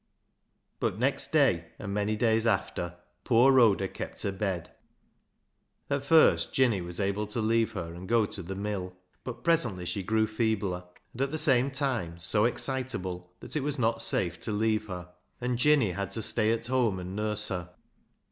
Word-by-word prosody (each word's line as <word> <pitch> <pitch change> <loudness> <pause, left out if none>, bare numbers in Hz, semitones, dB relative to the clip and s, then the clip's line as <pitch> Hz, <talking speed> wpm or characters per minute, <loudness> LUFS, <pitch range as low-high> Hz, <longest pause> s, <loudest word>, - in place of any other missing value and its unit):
But - - -1
next - - 0
day, - - +3
and 100 - -5
many 105 +1 0
days 115 0 +2
after, 85 -6 -1 0.3
poor 125 +3 +5
Rhoda 110 -7 +4
kept - - -7
her 100 - 0
bed. 95 -4 -3 1.2
At 140 -1 0
first 160 +3 +4
Jinny 120 -8 +2
was 85 0 -7
able 100 +1 -1
to 105 +3 -4
leave 115 +1 +1
her 85 -4 -5
and 90 +2 -9
go 115 -2 +4
to 100 - -7
the 95 +2 -6
mill, 95 -2 -4 0.3
but 125 - -7
presently 120 - +1
she 100 +3 -3
grew 110 +3 +1
feebler, 110 -5 -1 0.3
and 125 - -6
at 135 - +1
the 155 - -3
same 135 -4 +5
time 130 - -2
so 105 +6 +2
excitable, 95 -9 -2
that - - -5
it 150 - +1
was 145 +1 -2
not 115 -2 +1
safe 85 -3 0
to 110 - -4
leave 110 0 0
her, 90 -2 -6 0.3
and 125 -1 -2
Jinny 140 -7 +4
had 100 +1 -3
to 110 - -1
stay 110 0 +2
at 115 0 -1
home 120 -5 +1
and 90 +1 -6
nurse 105 0 0
her. 90 -3 -4
110 Hz, 180 wpm, -28 LUFS, 95-120 Hz, 1.2 s, poor